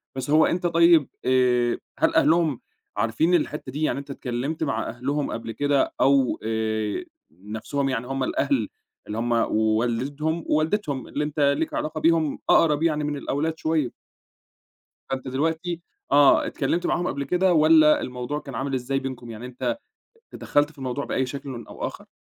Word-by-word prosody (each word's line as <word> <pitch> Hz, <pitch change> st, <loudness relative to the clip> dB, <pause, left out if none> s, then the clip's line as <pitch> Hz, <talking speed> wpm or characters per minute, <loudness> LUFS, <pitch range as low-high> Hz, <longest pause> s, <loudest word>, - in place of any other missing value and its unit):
بس 130 Hz, +1 st, -4 dB
هو 155 Hz, +2 st, +5 dB
أنت 175 Hz, 0 st, 0 dB
طيّب 170 Hz, -3 st, +5 dB, 0.2 s
آآ 125 Hz, -2 st, +3 dB, 0.2 s
هل -, -, +2 dB
أهلهم 160 Hz, -5 st, +3 dB, 0.4 s
عارفين 115 Hz, +11 st, +1 dB
الحتّة 150 Hz, -5 st, -1 dB
دي؟ 150 Hz, +4 st, -3 dB
يعني 140 Hz, -3 st, 0 dB
أنت 140 Hz, 0 st, -11 dB
اتكلّمت 135 Hz, +5 st, -3 dB
مع 140 Hz, -, -2 dB
أهلهم 140 Hz, +5 st, -2 dB
قبل 115 Hz, 0 st, -5 dB
كده، 145 Hz, +4 st, +1 dB
أو 135 Hz, -1 st, +3 dB
آآ 110 Hz, -1 st, -2 dB, 0.3 s
نفسهم 110 Hz, -, -4 dB
يعني 125 Hz, -2 st, -2 dB
هُم 135 Hz, 0 st, -2 dB
الأهل -, -, 0 dB, 0.4 s
اللي 105 Hz, -, -4 dB
هُم 120 Hz, +1 st, -1 dB, 0.2 s
والدهم 125 Hz, +9 st, 0 dB
ووالدتهم 155 Hz, -2 st, 0 dB
اللي 150 Hz, -, -2 dB
أنت 150 Hz, +1 st, -4 dB, 0.2 s
ليك 160 Hz, +1 st, -2 dB
علاقة 155 Hz, 0 st, -3 dB
بيهم 165 Hz, -2 st, +2 dB
أقرب 150 Hz, -1 st, +4 dB
يعني 155 Hz, -2 st, +1 dB
من 150 Hz, 0 st, -2 dB
الأولاد 155 Hz, +3 st, -2 dB
شويّة. 155 Hz, -7 st, 0 dB, 1.2 s
فأنت 130 Hz, -1 st, -3 dB
دلوقتي 165 Hz, +6 st, -1 dB, 0.3 s
آه 145 Hz, -1 st, +6 dB
اتكلمت 160 Hz, +5 st, -1 dB
معاهم 175 Hz, +1 st, 0 dB
قبل 140 Hz, 0 st, -3 dB
كده 180 Hz, +4 st, +2 dB
والّا 155 Hz, -1 st, +6 dB
الموضوع 125 Hz, +4 st, -4 dB
كان 135 Hz, -, -9 dB
عامل 135 Hz, +4 st, -2 dB
إزاي 130 Hz, +1 st, -1 dB
بينكم 130 Hz, -3 st, -6 dB
يعني 115 Hz, +2 st, -7 dB
أنت 130 Hz, -, -3 dB, 0.5 s
تدخلت 145 Hz, +2 st, 0 dB
في 155 Hz, -, -25 dB
الموضوع 135 Hz, +1 st, -3 dB
بأي 130 Hz, -, -1 dB
شكلِِ 130 Hz, -3 st, -6 dB
أو -, -, -4 dB
آخر؟ -, -, -9 dB
140 Hz, 160 wpm, -24 LUFS, 125-155 Hz, 1.2 s, آه